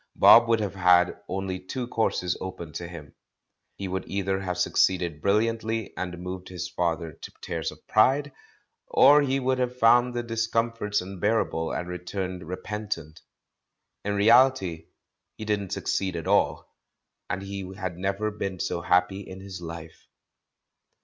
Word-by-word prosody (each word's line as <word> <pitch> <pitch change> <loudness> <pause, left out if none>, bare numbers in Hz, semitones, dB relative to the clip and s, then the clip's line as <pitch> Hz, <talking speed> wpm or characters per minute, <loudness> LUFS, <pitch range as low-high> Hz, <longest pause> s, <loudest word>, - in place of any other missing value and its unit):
Bob 115 0 +8
would 115 -1 +3
have 105 -3 -2
had 90 -1 +4
only 95 0 -3
two 125 +8 -5
courses 90 -7 0
open 90 -4 -6
to 85 - -5
him. 80 -5 -10 0.6
He 100 - -5
would 95 +1 -3
either 95 -1 -1
have 90 -2 -3
succeeded 90 -3 +1
brilliantly 110 +2 0
and 90 -1 -4
moved 90 +1 -7
his 90 -1 -5
father 85 -1 -2
to - - -11
tears - - -3
of - - -17
pride, 135 +6 +3 0.6
or 145 +2 +6
he 135 -1 +1
would 130 0 0
have 125 0 -1
found 120 +1 +4
the 120 - -1
discomforts 115 -2 -1
unbearable 95 -3 -1
and 90 - -3
returned 90 0 -5
repentant. 90 -4 -5 0.8
In 100 0 -1
reality 100 -6 +4 0.5
he 110 - -7
didn't 105 -2 -1
succeed 95 -2 -1
at 80 - -4
all, - - +1 0.6
and 95 - -3
he 100 -1 -6
had 95 -3 -5
never 100 +3 -1
been 100 -3 -4
so 85 - -2
happj^ 90 +3 +2
in 95 0 -9
his 95 -2 -8
life. 80 -1 -9
95 Hz, 150 wpm, -26 LUFS, 90-110 Hz, 0.8 s, Bob